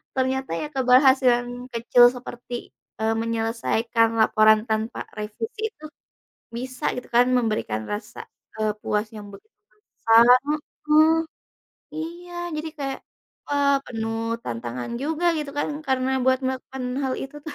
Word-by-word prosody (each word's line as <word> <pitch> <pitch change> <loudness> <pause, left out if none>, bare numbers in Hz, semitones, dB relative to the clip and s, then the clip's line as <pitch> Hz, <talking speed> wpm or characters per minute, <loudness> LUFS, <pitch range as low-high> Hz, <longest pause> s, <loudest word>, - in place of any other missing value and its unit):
ternyata 260 -3 -1
ya 300 - -3
keberhasilan 250 -2 +3
kecil 240 +1 +5
seperti, 245 -1 -8 0.3
eee, 220 0 +2
menyelesaikan 230 0 0
laporan 215 0 +5
tanpa 220 +1 -2
revisi 225 - -5
itu, 310 -6 -14 0.7
bisa 255 +1 -3
gitu 250 - -6
kan, 240 +1 +5
memberikan 215 - 0
rasa, 210 +2 -6 0.4
eee, 215 -1 +1
puas 210 +1 -1
yang 210 -1 -8
begitu 435 - -15 0.4
besar 225 +1 +5 0.6
heeh. 310 +1 +6 0.8
Iya, 345 +3 -7 0.2
jadi 315 +1 -4
kayak 275 -1 -4 0.5
wah, 285 -1 +3
penuh 225 0 -3
tantangan 120 - -5
juga 320 +4 -2
gitu 295 -2 -4
kan, - - 0 0.2
karena 260 0 +1
buat 260 0 +3
melakukan 260 0 -4 0.2
hal 265 -1 0
itu 270 +2 -11
tuh. 315 - -6
245 Hz, 125 wpm, -24 LUFS, 225-270 Hz, 0.8 s, heeh